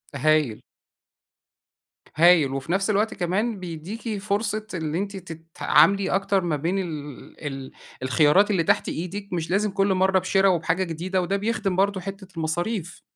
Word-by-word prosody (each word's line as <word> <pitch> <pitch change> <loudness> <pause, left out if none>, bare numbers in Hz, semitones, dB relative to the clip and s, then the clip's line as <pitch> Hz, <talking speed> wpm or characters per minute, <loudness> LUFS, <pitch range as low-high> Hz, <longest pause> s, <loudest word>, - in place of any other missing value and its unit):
هايل. 145 -5 +2 1.5
هايل، 160 -4 +5
وفي 135 +4 -4
نفس 195 +3 +1
الوقت 215 +1 +1
كمان 195 +5 -1
بيديكي 185 +6 -5
فرصة 210 +1 -2
إن 160 -3 -3
أنتِ 200 +2 -3
تتعاملي 175 +3 +2
أكتر 195 0 +1
ما 170 -3 0
بين 170 +7 -1
ال 150 -6 -7
ال 135 -1 -6 0.3
الخيارات 155 +10 +4
اللي 185 -5 +2
تحت - - +1
إيدِك، 195 +4 -5
مش 165 -2 -2
لازم 205 +2 +1
كل 195 0 +2
مرة 190 0 +3
بِشِرَا 195 +1 +2
وبحاجة 170 +1 +1
جديدة، 185 +2 -2
وده 195 +3 -1
بيخدم 205 -2 -1
برضو 195 +1 +1
حتة 195 +1 -7
المصاريف. 175 +3 -3
185 Hz, 145 wpm, -24 LUFS, 160-200 Hz, 1.5 s, هايل